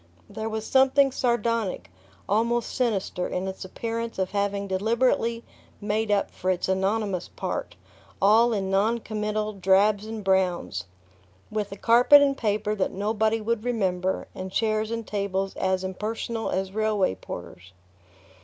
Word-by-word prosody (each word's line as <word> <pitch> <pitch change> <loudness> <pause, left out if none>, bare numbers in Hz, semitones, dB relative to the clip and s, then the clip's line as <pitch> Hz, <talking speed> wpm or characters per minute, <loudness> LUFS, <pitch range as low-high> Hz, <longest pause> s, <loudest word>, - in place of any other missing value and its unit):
There 220 0 -5
was 220 0 -4
something 270 +2 +4
sardonic, 230 -5 -1 0.4
almost 230 +3 +1
sinister, 210 -7 -1
in 185 +1 -3
its 190 - -6
appearance 230 +4 -4
of 190 -1 -1
having 200 0 -1
deliberately 230 +4 +1 0.4
"made 215 +1 -1
up" 205 -1 +1
for 185 - -3
its 180 -1 0
anonymous 190 0 0
part, - - -5 0.4
all 225 +4 +5
in 195 -3 -1
noncommittal 215 0 0
drabs 200 +2 +3
and 220 -1 -6
browns, 180 - 0 0.7
with 210 -2 -2
a 200 - -7
carpet 240 +7 +7
and 280 -1 +3
paper 210 -3 0
that 200 -3 0
nobody 220 +2 0
would 225 0 -1
remember, 190 -6 -1
and 185 0 -6
chairs 215 +1 0
and 230 -1 -3
tables 195 -2 -2
as 190 0 0
impersonal 220 +4 -3
as 190 0 -2
railway 215 - +1
porters. 90 -1 -9
210 Hz, 135 wpm, -26 LUFS, 190-225 Hz, 0.7 s, carpet